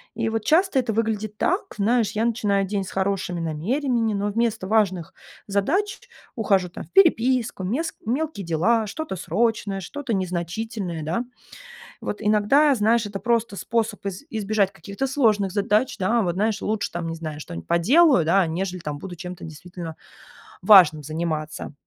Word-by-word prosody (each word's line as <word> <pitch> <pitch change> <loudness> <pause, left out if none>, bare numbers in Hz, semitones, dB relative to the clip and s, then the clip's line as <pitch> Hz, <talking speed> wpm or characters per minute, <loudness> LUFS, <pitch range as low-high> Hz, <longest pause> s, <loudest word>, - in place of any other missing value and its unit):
И 225 0 -1
вот 225 -1 -2
часто 340 - +3
это 245 -3 -1
выглядит 215 -1 -2
так, 365 - +1 0.2
знаешь: 220 +1 +2
я 220 +2 0
начинаю 205 -4 +1
день 200 0 -1
с 190 - -8
хорошими 190 -2 -1
намерениями, 225 - 0
но 200 0 -1
вместо 220 -2 -1
важных 195 -6 +1 0.3
задач 310 - -1 0.3
ухожу 195 -5 +2
там - - -8
в - - -18
переписку, 255 - +3
мес 265 - -2
мелкие 260 - -2
дела, 210 +8 +2
что-то 310 +2 -5
срочное, 200 +2 -1
что-то 265 +6 -5
незначительное, 185 0 -3
да. 170 +10 -1 0.8
Вот 210 - -4
иногда, 215 +8 +4
знаешь, 225 0 +2
это 200 -1 -6
просто 230 -2 0
способ 225 -1 -2
из 195 +3 -4
избежать 210 -3 0
каких-то 200 +10 -4
сложных 220 -8 +2
задач, 210 +5 +1
да. 220 +5 +2
Вот, 175 -5 0
знаешь, 215 +3 0
лучше 215 -1 -2
там, 170 -1 -4
не 165 - -3
знаю, 155 -2 -6
что-нибудь 85 - -8
поделаю, 235 - +4
да, 185 +2 +4
нежели 180 +3 -3
там 150 -3 -5
буду 180 +3 -8
чем-то 180 +1 -8
действительно 165 +1 -8 0.7
важным 175 -8 +7
заниматься. 155 0 -4
205 Hz, 155 wpm, -23 LUFS, 180-230 Hz, 0.8 s, важным